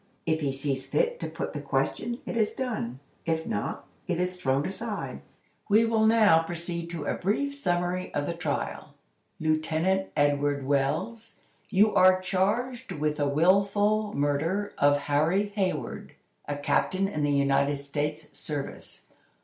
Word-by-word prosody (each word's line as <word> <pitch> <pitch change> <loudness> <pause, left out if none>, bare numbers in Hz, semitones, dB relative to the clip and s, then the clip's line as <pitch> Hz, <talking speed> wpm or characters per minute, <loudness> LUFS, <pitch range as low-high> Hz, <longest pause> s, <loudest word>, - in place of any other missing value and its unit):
If 160 -1 +1
he 145 -3 0
sees 135 0 -3
fit 485 0 +1
to - - -4
put - - -4
the - - -4
question, 240 +2 -1
it - - -4
is 220 -2 +1
done; 215 - -3 0.3
if 160 -1 0
not, 105 - -3 0.2
it 170 - -1
is 180 0 -1
thrown 135 -4 0
aside. 205 +2 -4 0.5
We 215 +3 +5
will 220 -1 +3
now 215 -8 +6
proceed 170 0 -4
to 165 -4 -5
a - - 0
brief 280 +10 0
summary 180 -7 -1
of 145 - 0
the 170 - -2
trial. 170 - -4 0.4
"Lieutenant 160 +5 +1
Edward 145 -1 +2
Wells, 150 - -1 0.3
you 210 +1 +4
are 185 0 +6
charged 220 +7 -1
with 150 0 -1
the 145 -1 +1
willful 200 +7 +2
murder 155 +8 0
of 145 0 +4
Harry 160 +8 +1
Hayward, 185 - -3 0.3
a 145 - -2
captain 185 +7 +1
in 155 -6 -3
the 145 - +1
United 140 0 +2
States 150 +2 -4
service. 145 -3 -5
170 Hz, 150 wpm, -27 LUFS, 145-205 Hz, 0.5 s, now